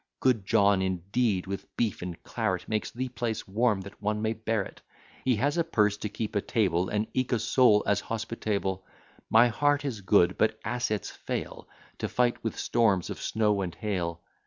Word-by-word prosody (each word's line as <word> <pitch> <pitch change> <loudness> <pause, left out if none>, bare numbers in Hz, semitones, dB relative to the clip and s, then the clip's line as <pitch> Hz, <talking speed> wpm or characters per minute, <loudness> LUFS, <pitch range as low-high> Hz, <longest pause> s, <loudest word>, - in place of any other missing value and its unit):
Good 115 -7 +2
John 100 -3 +4
indeed, 95 +2 0
with 100 0 -7
beef 115 -5 0
and 90 -1 -5
claret, - - -2
Makes 110 -1 -1
the 130 +2 -4
place 120 -2 -3
warm, 105 0 +1
that 100 +2 -11
one 105 +1 0
may 110 +1 0
bear 110 -2 -1
it. - - -12 0.4
He 130 -2 +3
has 145 +9 +1
a - - +4
purse 105 -10 +2
to 105 - -4
keep 105 +1 -4
a 100 - +2
table, 95 -7 +1
And 105 +1 0
eke 130 -1 0
a - - +4
soul 115 -1 +4
as 100 0 +2
hospitable. 105 -4 -2 0.5
My 115 +2 +6
heart 145 +5 +1
is 115 -7 -3
good; 95 -2 +3
but - - +2
assets 110 -2 -1
fail, - - -5 0.3
To - - -2
fight 120 -1 +1
with 115 - -3
storms 105 -7 +2
of - - -6
snow 105 -2 +1
and 90 -3 -4
hail. 90 -6 -3
105 Hz, 185 wpm, -28 LUFS, 100-120 Hz, 0.5 s, My